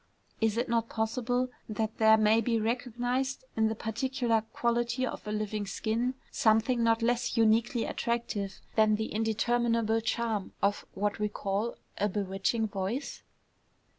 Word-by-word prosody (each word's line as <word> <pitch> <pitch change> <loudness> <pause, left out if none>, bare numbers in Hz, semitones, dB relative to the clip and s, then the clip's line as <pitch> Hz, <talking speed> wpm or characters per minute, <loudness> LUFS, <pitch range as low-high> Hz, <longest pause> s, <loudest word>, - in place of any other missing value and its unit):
Is 220 -1 +1
it 240 - 0
not 230 -1 0
possible 245 +3 -1 0.2
that 220 +1 -3
there 220 0 +7
may 215 +1 +4
be 230 0 +1
recognized, 245 +4 -1
in 220 0 +3
the 220 - -1
particular 230 +1 0
quality 240 +2 0
of 240 - -6
a - - -2
living 210 -1 -2
skin, 230 +5 -1 0.2
something 225 +2 +3
not 230 0 +3
less 240 +1 +1
uniquely 230 +2 +3
attractive 225 -5 -2
than 215 -1 +5
the 220 +1 -3
indeterminable 225 +1 +1
charm 225 -3 -1
of 200 +1 0
what 205 +2 -1
we 210 0 0
call 205 +3 -2 0.2
a 205 - +2
bewitching 200 +3 0
voice? 205 +7 -3
225 Hz, 140 wpm, -30 LUFS, 215-240 Hz, 0.2 s, there